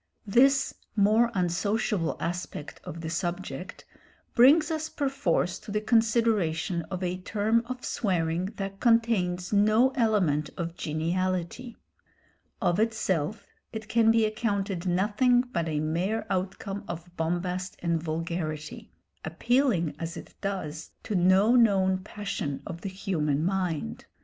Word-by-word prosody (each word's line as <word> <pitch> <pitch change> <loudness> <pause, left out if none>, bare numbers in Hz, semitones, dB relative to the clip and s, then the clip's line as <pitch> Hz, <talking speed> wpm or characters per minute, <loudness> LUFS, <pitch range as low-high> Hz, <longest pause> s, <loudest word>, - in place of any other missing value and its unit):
This 270 +6 +4 0.2
more 215 +3 +4
unsociable 185 0 0
aspect 175 -3 -5
of 165 - -7
the 160 - -4
subject 175 -2 -4 0.5
brings 295 +6 +6
us 315 0 -2
perforce 265 - 0
to 215 - -13
the 210 - +1
consideration 215 -7 +2
of 185 -1 -4
a 180 0 -1
term 220 +4 +1
of 255 0 -6
swearing 175 -4 0
that 195 0 -5
contains 220 -7 +2
no 215 +5 +4
element 200 - +1
of 170 -1 -3
geniality. 180 +8 -2 0.8
Of 175 +2 +1
itself 215 -4 0 0.3
it 220 -1 -6
can 225 0 +3
be 225 -1 +4
accounted 200 -4 -2
nothing 210 +7 +3
but 170 -10 -3
a 150 -1 -1
mere 175 +8 -1
outcome 195 +2 -3
of 170 +1 -7
bombast 180 +2 -2
and 170 -2 +1
vulgarity, 160 -1 -4 0.3
appealing 180 - +1
as 165 0 -5
it - - -10
does 185 -6 -4
to 220 - -4
no 190 +5 +4
known 190 -5 +4
passion 185 -8 -4
of 170 0 -7
the 195 - -4
human 160 -6 -1
mind. 180 - -2
190 Hz, 125 wpm, -27 LUFS, 170-220 Hz, 0.8 s, brings